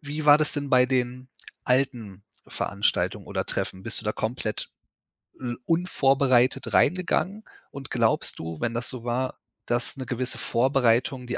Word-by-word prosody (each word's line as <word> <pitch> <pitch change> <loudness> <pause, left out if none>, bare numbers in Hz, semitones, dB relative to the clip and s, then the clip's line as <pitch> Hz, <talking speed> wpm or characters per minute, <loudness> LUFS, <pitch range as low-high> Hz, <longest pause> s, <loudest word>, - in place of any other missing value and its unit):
wie 150 0 -5
war 145 0 +9
das 155 0 0
denn 145 -1 -3
bei 125 0 +6
den 125 0 -1 0.4
alten 120 -7 0 0.2
Veranstaltungen - - -1
oder - - -2
Treffen? 95 - -3
Bist 115 +3 -2
du - - -14
da 105 - 0
komplett, 110 -1 -3 0.7
hm, 120 -2 -4
unvorbereitet 135 -7 +2
reingegangen 185 +3 +2 0.3
und 135 -1 -8
glaubst 115 -2 +1
du, 80 -1 -6
wenn 115 - -1
das 120 +1 -2
so 125 -3 -6
war, 125 +2 -2 0.3
dass 120 +2 -1
'ne 130 - -5
gewisse 125 0 -3
Vorbereitung 125 0 +1
die 125 - -2
125 Hz, 155 wpm, -26 LUFS, 120-135 Hz, 0.7 s, war